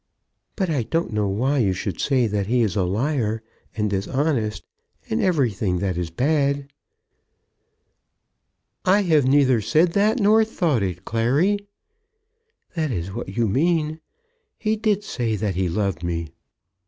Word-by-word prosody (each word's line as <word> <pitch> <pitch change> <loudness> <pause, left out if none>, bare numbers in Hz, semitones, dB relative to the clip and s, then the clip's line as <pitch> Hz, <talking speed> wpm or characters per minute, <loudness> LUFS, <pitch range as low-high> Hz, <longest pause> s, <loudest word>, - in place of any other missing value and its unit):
"But 190 -4 -1
I 145 -5 +1
don't 165 +2 -2
know 105 -1 0
why 130 +9 0
you 100 -6 +2
should 95 -1 -4
say 130 -4 +2
that 105 -3 -1
he 120 +2 +2
is 105 -3 -1
a 100 - +2
liar, 110 +2 -1 0.3
and 105 -1 +1
dishonest, 110 +3 -1 0.5
and 110 - +1
everything 115 - +1
that 95 0 -1
is 85 -1 -3
bad." 140 - 0 2.1
"I 195 +3 +4
have 155 -7 +3
neither 130 -4 +4
said 165 - +2
that, 215 +5 +2
nor 215 +1 +5
thought 170 - 0
it, 90 -1 -3
Clary." 140 - +1 1.1
"That 160 -4 -1
is 95 -5 -3
what 115 -2 -5
you 115 -1 +2
mean. 155 - +1 0.6
He 220 0 0
did 210 -2 0
say 115 - -2
that 105 -2 -1
he 90 0 -1
loved 100 -2 -1
me." 85 -2 -3
125 Hz, 145 wpm, -23 LUFS, 100-160 Hz, 2.1 s, nor